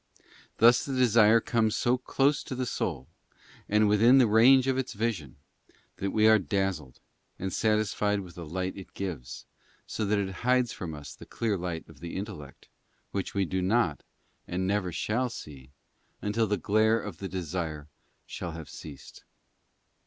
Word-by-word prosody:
Thus 120 +2 +6
the 135 - -4
desire 115 -2 +5
comes 110 -1 +1
so 120 +1 +2
close 135 +3 +1
to 130 - -5
the 130 0 -2
soul, 70 - -3 0.6
and 105 +1 +4
within 115 +5 +5
the 130 - +6
range 120 +5 +6
of 135 -1 +1
its 130 0 -2
vision, 100 - -3 0.6
that 100 - -2
we 110 +2 +3
are 110 0 +6
dazzled, 95 - -2 0.4
and 95 0 -4
satisfied 105 -2 +1
with 90 -2 -11
the 85 -1 -8
light 95 +3 -3
it 95 - -11
gives, 85 -11 -6
and - - -35
so 105 -3 -3
it 100 -2 +1
hides 125 0 +2
from 80 -4 -6
us 70 -2 -9
the - - -13
clear 110 -3 -1
light 85 -3 -4
of - - -16
the 85 0 -7
intellect, 95 -8 -8 0.4
which 100 +1 -4
we 100 -1 +2
do 95 +1 -2
not, 90 - +1 0.5
and 90 +1 -2
never 95 -2 0
shall 115 +9 -1
see, 70 - -10 0.5
until 110 +2 0
the 105 0 0
glare 110 +5 +2
of 100 -6 -7
the 95 - -5
desire 80 -4 -4 0.4
shall 85 - -6
have 80 -2 -8
ceased. 70 -4 -11
100 Hz, 165 wpm, -28 LUFS, 90-115 Hz, 0.6 s, Thus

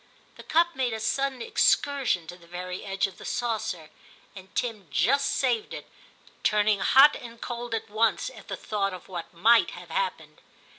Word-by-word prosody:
The - - -11
cup 340 +1 +2
made 255 -3 0
a 220 - -3
sudden 255 +3 -1
excursion 270 - +2
to 175 - -9
the 170 -1 -19
very 180 +1 -6
edge 195 -1 0
of 195 -2 -8
the - - -10
saucer, 210 -9 -3 0.4
and 190 -1 -11
Tim 220 -7 -2
just 250 - +2
saved 245 -5 0
it, - - -9 0.5
turning 210 -1 +2
hot 270 +8 +7
and 235 -1 -10
cold 240 -1 -4
at 225 - -4
once 225 - +1
at - - -14
the - - -4
thought 195 -3 -2
of 180 - -13
what 175 -3 -7
might 225 +7 +4
have - - -11
happened. - - -3
220 Hz, 180 wpm, -27 LUFS, 190-245 Hz, 0.5 s, hot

